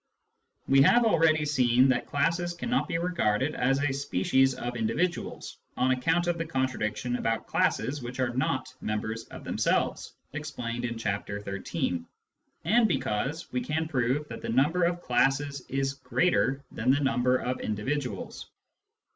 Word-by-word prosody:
We 135 0 +6
have 235 - +6
already 160 -6 +3
seen 130 -3 +4
that 130 -1 +1
classes 170 +4 0
cannot 240 +8 -1
be 165 - -1
regarded 155 -6 0
as 135 +2 +1
a 145 -1 +1
species 135 0 +2
of 120 0 -4
individuals, 120 +11 -2 0.2
on 130 +1 +2
account 165 +7 +1
of 175 -1 -1
the 165 - -1
contradiction 125 -4 -1
about 115 -2 -1
classes 145 +1 0
which 125 +2 -7
are 125 -1 +1
not 130 0 -1
members 110 +1 -3
of - - -11
themselves - - 0 0.2
(explained 125 -5 -4
in 115 -1 -3
Chapter 100 -2 -3
XIII.), 95 -4 -3 0.6
and 225 +6 +4
because 150 - -2
we 125 - -1
can 155 +5 -1
prove 135 +1 0
that - - -7
the - - -5
number 150 +9 +3
of 175 0 -1
classes 135 +3 +1
is 135 0 0
greater 140 -1 +1
than 115 +3 -2
the 140 +2 +5
number 125 -2 +2
of 125 0 -3
individuals. 115 0 -3
135 Hz, 150 wpm, -28 LUFS, 120-155 Hz, 0.6 s, We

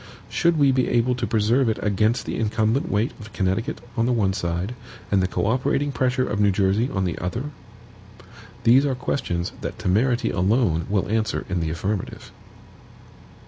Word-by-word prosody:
Should 170 -1 +2
we 140 -2 +5
be 130 -1 +1
able 120 +1 +2
to 125 - -2
preserve 115 +4 +2
it 110 - 0
against 105 +3 +1
the - - -3
incumbent 110 +7 0
weight 105 +5 +1
of 110 -1 -11
Connecticut 100 +8 -1 0.2
on 115 -1 +1
the - - +2
one 105 -6 +1
side, 90 +3 -2 0.4
and 100 -2 +3
the 95 - +1
co - - -2
operating 130 +5 +1
pressure 130 -1 0
of 105 0 -2
New 105 -1 +4
Jersey 100 +5 +1
on 95 -6 -1
the 90 - -3
other? 120 - -4 1.1
These 120 +4 +6
are 140 -2 0
questions 90 -8 -2
that - - -5
temerity 120 +6 +1
alone 90 -4 +1
will 100 -2 0
answer 110 0 -1
in 95 -1 -1
the 80 -1 -1
affirmative. 95 +5 -4
110 Hz, 175 wpm, -23 LUFS, 95-125 Hz, 1.1 s, These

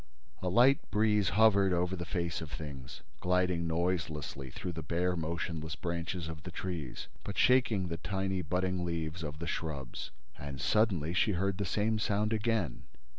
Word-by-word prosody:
A 90 - 0
light 125 +8 +6
breeze 105 -3 +3
hovered 100 -3 +6
over 90 +2 +1
the 85 -1 -4
face 85 +1 -2
of 80 - -6
things, 70 -4 -7 0.2
gliding 90 -2 +2
noiselessly 80 -5 -1
through 90 - -5
the 80 -1 -5
bare 90 +4 0
motionless 80 -1 -3
branches 85 0 -3
of 80 -1 -6
the 90 - -7
trees, 85 -6 -4 0.2
but 100 - -5
shaking 120 -7 +4
the 85 -1 -3
tiny 95 +1 -1
budding 90 0 0
leaves 85 0 -2
of 75 -2 -5
the 85 - -4
shrubs. 75 -6 -4 0.3
And, 70 -2 -6
suddenly, 90 -3 +2
she 105 +3 +3
heard 100 +2 0
the 100 - 0
same 110 +4 +1
sound 105 +1 +1
again. 110 - 0
90 Hz, 165 wpm, -32 LUFS, 80-100 Hz, 0.3 s, light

